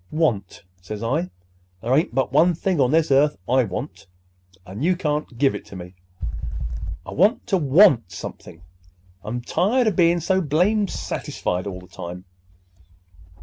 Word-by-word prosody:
'Want?' 115 - -1 0.2
says 105 +4 -6
I. 150 +10 0 0.5
'There 120 +5 -1
ain't 150 -4 +1
but 130 -1 0
one 165 +4 +4
thing 175 -2 0
on 125 - +3
this 160 +1 +2
earth 145 +2 +4
I 130 +1 +4
want, 105 - -6 0.6
and 100 +8 -6
you 180 +2 +3
can't 150 -6 -2
give 135 +1 +3
it - - -6
to - - -12
me. 90 0 -9 1.1
I - - -8
want 200 - +3
to 195 - +1
want 140 - +5
something. 90 -2 -9 0.6
I'm 120 +3 -4
tired 220 - +1
of 215 -4 +1
bein' 170 0 +4
so 190 +3 +1
blamed 185 +7 +2
satisfied 90 +2 -3
all 90 -2 -5
the 90 - -15
time! 90 +1 -8
145 Hz, 155 wpm, -23 LUFS, 110-175 Hz, 1.1 s, want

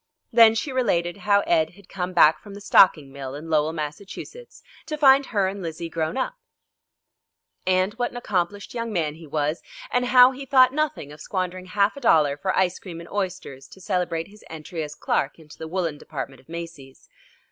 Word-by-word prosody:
Then 225 -1 +7
she 270 +5 -2
related 185 -9 0
how 200 +1 +3
Ed 160 -3 +1
had 200 -2 -18
come 180 -1 -4
back 155 -3 +5
from 200 -1 -11
the - - -8
stocking 155 -8 +4
mill 135 -1 -7
in 160 +3 -8
Lowell, 155 0 +2
Massachusetts, 170 - -8 0.2
to 305 -1 -3
find 275 -2 +5
her 200 -4 +1
and 195 +1 -5
Lizzie 165 0 -5
grown 160 +7 -2
up, 260 - -1 1.3
and 185 +2 +2
what 240 +2 -2
an - - -9
accomplished 200 -3 -2
young 230 -1 -3
man 160 -7 -1
he 160 0 -13
was, 150 +2 -1 0.3
and 245 0 +1
how 250 0 +7
he 270 +1 -8
thought 260 -1 +5
nothing 295 - -2
of 150 - -12
squandering 185 -1 -4
half 200 +4 +1
a 280 - -9
dollar 150 - +4
for 190 +6 -2
ice 185 -1 +1
cream 170 -4 -9
and 170 - -11
oysters 185 -9 -4
to - - -15
celebrate 175 -2 -2
his 210 +1 -17
entry 160 +1 -6
as 150 -1 -6
clerk 140 - -1
into 155 -2 -16
the 160 - -6
woollen 165 -4 -2
department 135 -4 -7
of 130 - -30
Macy's. 165 -5 -9
180 Hz, 195 wpm, -24 LUFS, 155-210 Hz, 1.3 s, Then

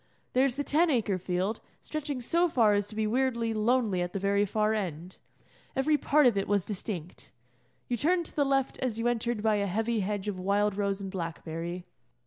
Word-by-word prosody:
There 255 +2 +4
is 260 -3 0
the 285 - -1
Ten 320 +4 +3
Acre 215 -8 +1
field, 185 +4 -1 0.2
stretching 290 -4 -4
so 340 +8 +2
far 225 -8 +4
as 205 0 +1
to 215 - -9
be 220 0 0
weirdly 235 0 0
lonely 215 -3 +1
at 175 0 -3
the 195 - -2
very 200 +1 +2
far 215 +2 +1
end. 180 -4 -4 0.6
Every 295 +3 +3
part 295 0 +3
of 240 -4 +5
it 195 - -1
was 200 -3 +1
distinct. 185 -4 -6 0.6
You 240 - -1
turned 345 +6 +2
to - - -9
the 290 - +3
left 270 -1 0
as 250 -4 -2
you 230 +1 0
entered 235 -2 -1
by 215 -1 +3
a 200 0 0
heavy 225 +4 0
hedge 205 0 -2
of 195 -3 -3
wild 200 +2 +1
rose 200 -1 -1
and 195 -1 -5
blackberry. 170 0 -5
215 Hz, 205 wpm, -29 LUFS, 195-255 Hz, 0.6 s, of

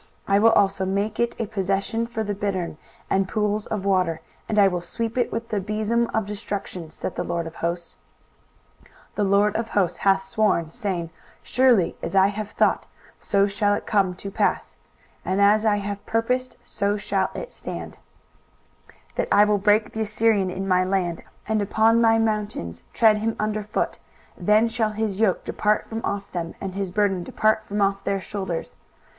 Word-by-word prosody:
23:014:023 195 - +3
I - - +5
will 225 +2 +6
also 195 -2 +3
make 200 +3 -1
it 235 0 +1
a 230 - 0
possession 200 +2 -1
for 225 -2 -3
the 205 -1 -2
bittern, 190 -5 -3 0.3
and 195 0 +1
pools 210 0 -1
of 205 -3 -3
water: 180 -4 +1 0.3
and 215 - -1
I 200 -1 +7
will 180 -2 -1
sweep 230 +6 -4
it 245 - 0
with 230 +1 -4
the 210 - 0
besom 220 +3 0
of 220 -2 0
destruction, 200 -4 -5
saith 165 - -5
the - - -3
LORD 170 -1 -2
of 165 0 -9
hosts. 170 +1 -3 0.9
23:014:024 - - -24 0.3
The 210 - +2
LORD 200 +1 +3
of 225 0 -3
hosts 190 -5 +1
hath 195 -1 +3
sworn, 195 -5 +1
saying, 185 -7 -3 0.3
Surely 245 -9 +3
as - - -4
I 195 0 +6
have 210 0 -5
thought, - - +1 0.3
so 200 -1 +2
shall 205 0 +1
it - - -5
come 195 -4 +1
to 195 +2 -7
pass; - - 0 0.5
and 190 +1 -1
as 210 +2 +4
I 210 - +4
have 205 0 -4
purposed, 250 +3 -1
so 200 +1 -1
shall 195 -2 0
it - - -6
stand: - - -7 1.1
23:014:025 - - -31
That - - 0
I 205 - +7
will 210 -1 +2
break 210 +2 +3
the 220 - -3
Assyrian 215 -2 +2
in 190 +2 -4
my 185 -1 +3
land, 185 -3 -1 0.3
and 215 -1 +1
upon 220 +3 +3
my 225 -1 +5
mountains 210 - -2
tread 220 -2 +4
him 225 +1 -1
under 215 0 -1
foot: 210 - -2 0.4
then 210 +5 +3
shall 225 -2 -1
his 215 -2 -2
yoke 215 -5 +2
depart 210 0 0
from 225 0 -4
off 200 0 -3
them, 170 -2 -4
and 195 -1 -5
his 195 -1 -3
burden 195 -1 +1
depart 220 +4 +1
from 205 -1 -1
off 195 0 0
their 195 -1 0
shoulders. 190 -3 -4
205 Hz, 190 wpm, -24 LUFS, 190-220 Hz, 1.1 s, I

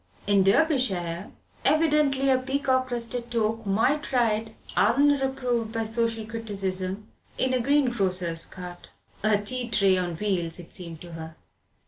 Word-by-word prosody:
In 200 -1 +4
Derbyshire, 195 - +1 0.3
evidently, 290 -2 +3
a 260 - +3
peacock 260 -1 0
crested 240 0 -2
toque 225 -2 -1
might 230 +10 +1
ride, 225 -3 +1 0.2
unreproved 265 -2 +2
by 225 -1 -1
social 225 0 -1
criticism, 200 -3 -3 0.3
in 260 0 +1
a 255 - +2
greengrocer's 195 - +1
cart. 180 -1 -10 0.3
A 215 0 +4
tea 240 +4 -2
tray 195 -4 +3
on 175 -2 -2
wheels 175 -3 -1
it 175 -2 -11
seemed 170 -4 -7
to 175 - -10
her. 160 -1 -8
225 Hz, 130 wpm, -26 LUFS, 190-255 Hz, 0.3 s, In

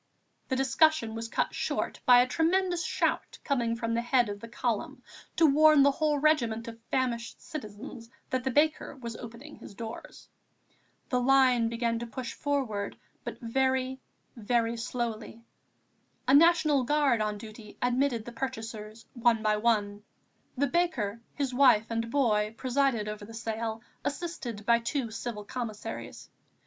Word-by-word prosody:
The 260 - +1
discussion 270 -2 +3
was 225 0 -4
cut - - -1
short - - -2
by 245 -1 +8
a - - -3
tremendous 345 +4 +1
shout - - -1
coming 240 -5 0
from 230 0 -2
the 230 - +1
head 240 -2 +2
of 205 0 -5
the 230 - -9
column 230 -2 -3 0.3
to 330 - +5
warn 305 0 +6
the 280 - +5
whole 300 +1 +1
regiment 245 -7 +1
of 230 0 -9
famished 240 -3 -1
citizens 230 -3 -8 0.2
that 255 -1 0
the 265 - 0
baker 295 +2 +1
was 235 -3 -7
opening 245 +6 -10
his 200 - -12
doors. 225 +2 -8 0.8
The 250 - +1
line 250 -2 +4
began 230 0 -1
to 235 - -5
push 250 +1 -6
forward, 255 -9 -2 0.3
but - - -6
very, 260 +2 0 0.3
very 230 0 0
slowly. 230 -1 -4 0.8
A 265 - +4
National 305 -3 +5
Guard 275 -3 +2
on 210 -1 -1
duty 215 0 -11
admitted 245 -2 +1
the 240 - -7
purchasers 225 -3 -6
one 235 -2 +2
by 215 0 +2
one. 210 -2 0 0.5
The 285 - +3
baker, 250 - 0
his 275 -3 -2
wife 245 -5 +5
and 230 0 -1
boy 220 -5 +1
presided 255 -4 +1
over 210 0 -5
the 225 +2 -10
sale, 225 0 -4 0.2
assisted 275 -10 -4
by 235 0 +5
two 235 0 -2
Civil 220 -2 -5
Commissaries. 220 -1 -6
240 Hz, 150 wpm, -29 LUFS, 225-270 Hz, 0.8 s, by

